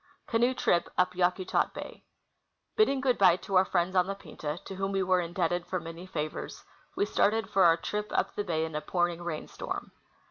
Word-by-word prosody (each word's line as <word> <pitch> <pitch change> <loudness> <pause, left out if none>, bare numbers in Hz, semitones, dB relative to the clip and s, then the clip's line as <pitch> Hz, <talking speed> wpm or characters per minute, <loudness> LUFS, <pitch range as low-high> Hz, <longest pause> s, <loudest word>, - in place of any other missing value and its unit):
Canoe 240 +3 +2
Trip 170 -7 +1
up 180 0 +2
Yakutat 180 +1 +1
Bay. - - -8 0.7
Bidding 275 -12 +3
good 255 -3 +1
bye 185 -3 +7
to 195 +2 -8
our 185 0 +6
friends 185 0 0
on 180 0 +4
the 195 - -3
Pinta, 155 -5 -6
to 195 - -7
whom 195 0 -1
we 195 -1 +1
were 185 -1 +3
indebted 175 0 -1
for 185 0 -1
many 165 +2 -9
favors, 155 -4 -5 0.3
we' 400 - +2
started 220 - +1
for 190 -2 +5
our 165 -1 +6
trip 210 +4 -3
up - - 0
the 205 - -2
bay 160 -4 0
in 160 - -7
a 150 - -2
pouring 175 +1 0
rain 170 -3 -4
storm. - - -6
180 Hz, 205 wpm, -29 LUFS, 170-195 Hz, 0.7 s, bye